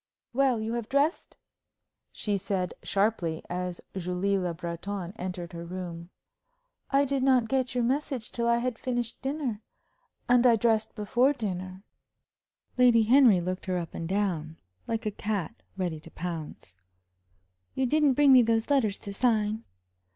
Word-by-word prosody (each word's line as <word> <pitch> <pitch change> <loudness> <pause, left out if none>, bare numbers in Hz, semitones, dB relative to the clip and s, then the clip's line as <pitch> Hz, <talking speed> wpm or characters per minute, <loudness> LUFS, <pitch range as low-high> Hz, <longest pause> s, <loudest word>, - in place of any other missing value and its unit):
"Well, 260 -2 +2
you 220 +1 -3
have 235 -2 -4
dressed?" 285 +5 0 0.7
she 205 -2 -2
said, 190 -2 -2
sharply, 195 -6 0
as 180 0 -3 0.2
Julie 185 +2 0
Le 180 -2 -1
Breton 175 +3 -5
entered 180 -3 -6
her 170 0 -6
room. 170 -1 -7 0.8
"I 280 +1 +3
did 275 0 -1
not 255 -3 +4
get 255 0 0
your 245 - +2
message 265 -2 -1
till 235 -1 -1
I 235 0 +4
had 240 -1 -2
finished 245 -2 -3
dinner. 270 -6 -3 0.7
And 245 0 +5
I 235 - +6
dressed 220 -1 +1
before 240 +6 +2
dinner." 185 -6 -5 1.0
Lady 240 -2 +6
Henry 235 -4 +6
looked 185 +2 -4
her 185 -1 0
up 170 -2 -5
and 165 0 -5
down, 175 -6 -1 0.3
like 225 0 -2
a 215 - 0
cat 205 -4 -4 0.2
ready 175 -4 -2
to 165 - -14
pounce. 160 - -7 1.0
"You 265 - +1
didn't 295 +1 +3
bring 280 0 +6
me 255 - +9
those 225 +2 +1
letters 225 -8 +2
to 200 - -7
sign?" 220 -1 +1
215 Hz, 150 wpm, -28 LUFS, 180-250 Hz, 1.0 s, me